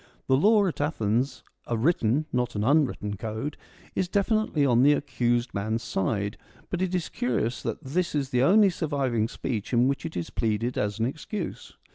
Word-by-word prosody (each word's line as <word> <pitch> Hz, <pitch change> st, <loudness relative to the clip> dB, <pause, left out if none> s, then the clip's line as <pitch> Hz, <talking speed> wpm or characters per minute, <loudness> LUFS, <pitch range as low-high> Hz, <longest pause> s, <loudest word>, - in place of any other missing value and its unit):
The 130 Hz, -, +3 dB
law, 205 Hz, +8 st, +5 dB
at 170 Hz, -5 st, -2 dB
Athens 130 Hz, -2 st, 0 dB, 0.2 s
a 120 Hz, -, 0 dB
written, 135 Hz, +1 st, +2 dB
not 125 Hz, -2 st, 0 dB
an 105 Hz, -, 0 dB
unwritten 130 Hz, -7 st, +1 dB
code, 110 Hz, +8 st, -4 dB, 0.4 s
is 185 Hz, -, 0 dB
definitely 200 Hz, -5 st, +1 dB
on 120 Hz, -2 st, +4 dB
the 145 Hz, +3 st, +6 dB
accused 120 Hz, -4 st, 0 dB
man's 110 Hz, +3 st, -2 dB
side; 100 Hz, +1 st, -1 dB, 0.3 s
but 180 Hz, -, -1 dB
it 185 Hz, -1 st, 0 dB
is 180 Hz, -, -1 dB
curious 120 Hz, -1 st, -1 dB
that -, -, -4 dB
this 170 Hz, +5 st, -1 dB
is 140 Hz, -2 st, -1 dB
the 125 Hz, -, +2 dB
only 200 Hz, +7 st, +6 dB
surviving 135 Hz, -9 st, 0 dB
speech 115 Hz, -2 st, -4 dB
in 120 Hz, +1 st, +4 dB
which 140 Hz, 0 st, -1 dB
it 165 Hz, -, -5 dB
is 85 Hz, -, -4 dB
pleaded 115 Hz, +2 st, -1 dB
as 105 Hz, 0 st, -1 dB
an 115 Hz, -, +1 dB
excuse. 160 Hz, -, -5 dB
130 Hz, 180 wpm, -27 LUFS, 115-160 Hz, 0.4 s, the